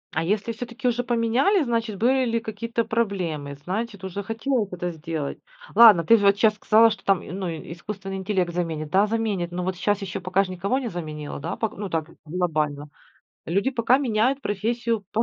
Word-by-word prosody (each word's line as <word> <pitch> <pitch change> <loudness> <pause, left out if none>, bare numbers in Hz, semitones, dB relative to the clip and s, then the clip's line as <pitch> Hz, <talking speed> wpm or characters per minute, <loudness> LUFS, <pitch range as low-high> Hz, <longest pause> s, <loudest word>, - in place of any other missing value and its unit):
А 160 - +1
если 210 +6 0
всё-таки 245 +3 -4
уже 245 0 +1
поменяли, 240 - +2
значит 230 -5 -1
были 260 +4 +3
ли 230 -1 0
какие-то 230 +1 -3
проблемы, 180 -11 -2
значит 200 +3 -4
уже 190 +1 -4
хотела 225 +2 -1
это 180 0 -3
сделать. 160 -3 -5 0.3
Ладно, 215 -8 +8
ты 230 +8 +6
же 205 - 0
вот 200 0 +5
щас 215 0 +4
сказала, 220 +2 +5
что 215 - -6
там, 195 -3 +2
ну, 185 +1 -4
искусственный 195 +4 -6
интеллект 190 -2 -1
заменит. 160 -3 -3
Да, 195 +3 +4
заменит. 210 -6 -1
Но 180 +1 -3
вот 185 +1 -2
щас 205 +3 0
еще 185 -2 -4
пока 185 +2 +1
ж 190 - -7
никого 190 +7 -1
не 255 -3 -3
заменило, 155 -5 -6
да? - - -4 0.2
Ну 200 -1 -4
так, 160 -1 -2 0.2
глобально. 150 -3 -1 0.6
Люди 195 +10 +1
пока 245 0 +3
меняют 260 +1 +1
профессию 230 +1 -1
по 225 - +2
200 Hz, 185 wpm, -24 LUFS, 175-230 Hz, 0.6 s, Ладно